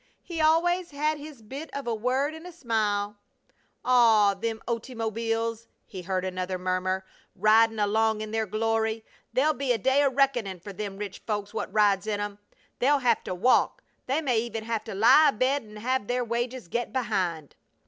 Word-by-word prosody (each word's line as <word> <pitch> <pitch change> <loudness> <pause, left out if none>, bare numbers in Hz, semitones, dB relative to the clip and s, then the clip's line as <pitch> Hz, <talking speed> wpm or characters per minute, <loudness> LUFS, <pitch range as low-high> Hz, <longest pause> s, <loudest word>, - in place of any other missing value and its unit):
"He 330 -3 -4
always 345 +3 +3
had 300 +1 -1
his 290 -5 -11
bit 275 +9 -7
of 280 - -4
a 235 - -1
word 255 +7 0
an' 320 +2 -9
a - - -8
smile!" 210 -8 -1 0.7
"Aw! 225 -5 +5
Them 220 +3 -3
ottymobbeels!" 230 -1 -2 0.2
he 190 -4 -8
heard 185 +1 -2
another 185 0 -3
murmur. 185 +1 -1 0.3
"Ridin' 220 +3 +4
along 215 +1 +1
in 215 0 -5
their 220 -1 -1
glory! 220 +1 -1 0.3
They'll 275 +6 +2
be 275 -2 -1
a - - 0
day 265 +6 +3
o' 280 - +4
reckonin' 250 -8 +1
fer 200 +3 -9
them 200 0 -5
rich 200 -2 -6
folks 205 -1 -3
what 220 - -4
rides 205 -1 +3
in 210 -1 -1
'em! 205 0 -4 0.4
They'll 285 +4 +4
hev 245 -4 +1
to 185 - -3
walk! 240 +8 +2 0.2
They 275 +5 +1
may 250 -7 +1
even 225 -1 -4
have 225 -1 -2
to 220 - -6
lie 255 +9 +7
abed 270 +3 +1
an' 210 0 -13
hev 245 +1 -1
their 245 0 0
wages 240 -1 -3
get 240 +7 -2
behind!" 190 - -2
225 Hz, 180 wpm, -27 LUFS, 205-260 Hz, 0.7 s, lie